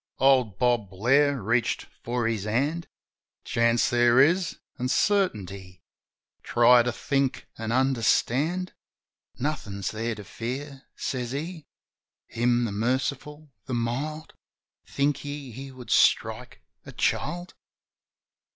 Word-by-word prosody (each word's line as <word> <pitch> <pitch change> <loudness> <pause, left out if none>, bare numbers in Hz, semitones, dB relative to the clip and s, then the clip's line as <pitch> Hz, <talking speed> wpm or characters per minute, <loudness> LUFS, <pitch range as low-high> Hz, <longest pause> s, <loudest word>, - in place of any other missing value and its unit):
Old 130 -7 +3
Bob 120 -4 +1
Blair 135 +8 +2
reached 115 +2 0 0.2
for 120 -1 -1
his 110 -3 -2
hand. 140 +10 -1 0.6
"Chance 115 0 +2
there 120 0 +4
is, 170 +5 +3 0.2
an' 125 - -1
certainty. 100 - 0 0.6
Try 120 +1 +5
to 120 +1 0
think 135 +2 -1
an' 110 0 -3
understand. 135 +7 +1 0.6
Nothin's 105 -9 -3
There 115 +1 -3
to 105 - -9
fear," 135 +7 -6
says 125 -1 -3
he. 160 +2 -5 0.6
"Him, 120 +1 +1
the 110 - -3
Merciful, 130 +7 -2 0.2
the 130 - -2
Mild, 140 +7 -3 0.5
Think 145 0 0
ye 145 -2 -6
He 135 +4 -8
would 130 -2 -10
strike - - +2 0.2
a - - -10
child? 175 +1 -1
125 Hz, 115 wpm, -26 LUFS, 115-145 Hz, 0.6 s, Try